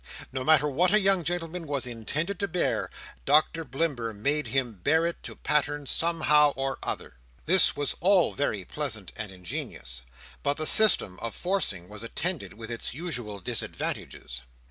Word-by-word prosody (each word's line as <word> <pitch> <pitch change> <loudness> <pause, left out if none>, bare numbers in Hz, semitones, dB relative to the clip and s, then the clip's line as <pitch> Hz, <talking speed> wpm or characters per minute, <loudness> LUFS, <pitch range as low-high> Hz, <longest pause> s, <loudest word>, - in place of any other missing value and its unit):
No 130 -1 -2
matter 150 0 +5
what 170 +6 +2
a - - +6
young 195 -3 +2
gentleman 165 0 -3
was 140 -3 -1
intended 145 - -2
to 200 - 0
bear, 180 -1 0 0.3
Doctor 155 - +3
Blimber 135 -7 -2
made 140 +6 0
him 120 -5 -1
bear 160 +3 +3
to - - -10
pattern, 145 -1 0
somehow 150 -2 +3
or 135 0 -2
other. 65 - -4 0.3
This 185 +3 +6
was 145 -1 0
all 185 0 +4
very 110 -9 -1
pleasant 110 - -4
and 110 -3 -6
ingenious, 85 -8 -5 0.4
but 140 0 0
the 155 - -1
system 180 - +4
of 115 -1 -4
forcing 175 - 0
was 105 0 -6
attended 115 - -1
with 115 +1 -8
its 115 +1 -4
usual 125 - -5
disadvantages. - - -4
145 Hz, 155 wpm, -27 LUFS, 115-165 Hz, 0.4 s, a